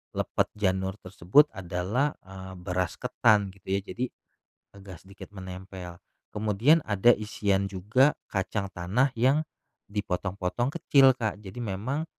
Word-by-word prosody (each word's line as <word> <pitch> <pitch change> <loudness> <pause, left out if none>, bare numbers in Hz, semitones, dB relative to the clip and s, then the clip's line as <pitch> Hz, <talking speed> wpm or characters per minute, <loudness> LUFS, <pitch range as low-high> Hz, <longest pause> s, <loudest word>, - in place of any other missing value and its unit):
lepet - - 0
janur 95 -2 0
tersebut 95 - +3
adalah, 95 +10 -1
eee, 95 0 -10
beras 90 0 -2
ketan, 110 -5 +2
gitu 95 0 -23
ya, 95 +1 +1
jadi 120 +5 -3 0.7
agak 95 -3 -11
sedikit 100 +1 -13
menempel. 95 -2 -8 0.3
Kemudian 110 +8 +3
ada 105 +2 +3
isian 100 -2 0
juga 105 +9 +2 0.2
kacang 100 0 -2
tanah 95 +9 +1
yang 135 +6 +3 0.5
dipotong-potong 100 +2 -2
kecil, 135 -5 +5
Kak. 110 -3 -3
Jadi 100 +1 -10
memang 120 +7 -3
100 Hz, 125 wpm, -27 LUFS, 95-120 Hz, 0.7 s, kecil